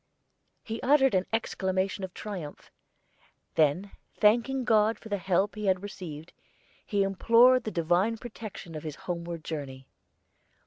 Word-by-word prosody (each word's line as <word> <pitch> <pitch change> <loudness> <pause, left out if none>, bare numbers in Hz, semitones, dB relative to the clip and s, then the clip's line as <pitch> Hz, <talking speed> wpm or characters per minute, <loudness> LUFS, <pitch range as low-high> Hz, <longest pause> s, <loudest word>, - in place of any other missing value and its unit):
He 225 0 -5
uttered 270 -2 +4
an 185 0 +1
exclamation 190 -3 -1
of 190 - -4
triumph; 180 -9 -7 0.8
then, 160 +6 +2 0.2
thanking 240 +5 +3
God 220 -1 +3
for 220 - -12
the 205 -1 -1
help 190 +3 +1
he 210 -1 -4
had 185 0 +2
received, 170 -6 -8 0.5
he 200 -1 +1
implored 230 +6 +5
the - - -1
Divine 180 +6 +1
protection 215 -7 -9
on 155 - -5
his 155 -2 -6
homeward 170 -2 -4
journey. 135 -5 -6
195 Hz, 135 wpm, -28 LUFS, 170-225 Hz, 0.8 s, implored